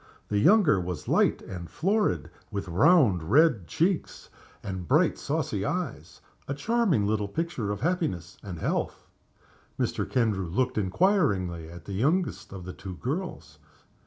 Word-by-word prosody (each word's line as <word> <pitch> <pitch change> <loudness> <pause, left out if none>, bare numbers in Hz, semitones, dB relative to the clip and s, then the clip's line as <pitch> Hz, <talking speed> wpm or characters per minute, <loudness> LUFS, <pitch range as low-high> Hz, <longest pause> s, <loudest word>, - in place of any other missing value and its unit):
The 105 - +1
younger 165 - +5
was 90 -3 -5
light - - +2
and 85 -3 -7
florid, 195 - 0 0.2
with 100 -1 -4
round 110 - +4
red 130 - +4
cheeks 175 - -1 0.3
and 95 -3 -5
bright, 155 +6 +3
saucy 140 -10 -2
eyes 115 - -4 0.3
a 140 - -2
charming 200 - +1
little 105 0 0
picture 125 - -3
of 100 - -4
happiness 140 - -2
and 95 -4 -7
health. - - -2 0.7
Mr. - - -1
Kendrew 105 -7 +1
looked 125 +6 0
inquiringly 95 - +1
at 85 0 -11
the 100 - -6
youngest 155 - 0
of 95 -3 -8
the 90 - -6
two 95 -2 -8
girls. 125 - -5
105 Hz, 140 wpm, -27 LUFS, -, 0.7 s, younger